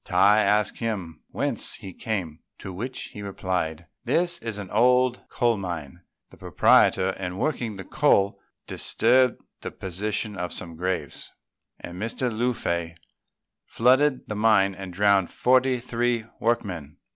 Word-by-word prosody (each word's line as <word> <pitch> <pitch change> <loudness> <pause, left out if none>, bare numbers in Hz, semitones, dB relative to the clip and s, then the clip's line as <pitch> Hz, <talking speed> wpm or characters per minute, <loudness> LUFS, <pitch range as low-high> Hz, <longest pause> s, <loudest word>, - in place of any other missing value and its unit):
Tai 105 +1 +4
asked 105 0 +2
him 95 -9 -4
whence - - -2
he 95 - -9
came; 90 -9 -4 0.2
to 95 - -8
which 125 +8 -5
he 105 - -8
replied, 90 -4 -3 0.2
"This 170 +6 +1
is 115 -7 -4
an 100 -3 -7
old 125 +3 +3
coal 120 -3 +1
mine. 85 -8 -6 0.3
The - - -16
proprietor, 95 +1 +4
in 90 -1 -4
working 120 -5 -2
the 95 - -7
coal, 100 -9 +2 0.3
disturbed 125 +1 +2 0.2
the - - -4
position 105 +3 -3
of 90 -2 -4
some 85 -2 -5
graves; 90 +3 -3 0.5
and 90 +2 -8
Mr. 115 +1 -2
Lung 120 +2 0
fei 85 -5 -2 0.7
flooded 130 +3 +3
the - - -4
mine 105 -2 +3
and 95 -1 -8
drowned 100 0 +3
forty 130 0 +2
three 120 -1 -1
workmen. 90 -10 -2
105 Hz, 140 wpm, -25 LUFS, 95-120 Hz, 0.7 s, Tai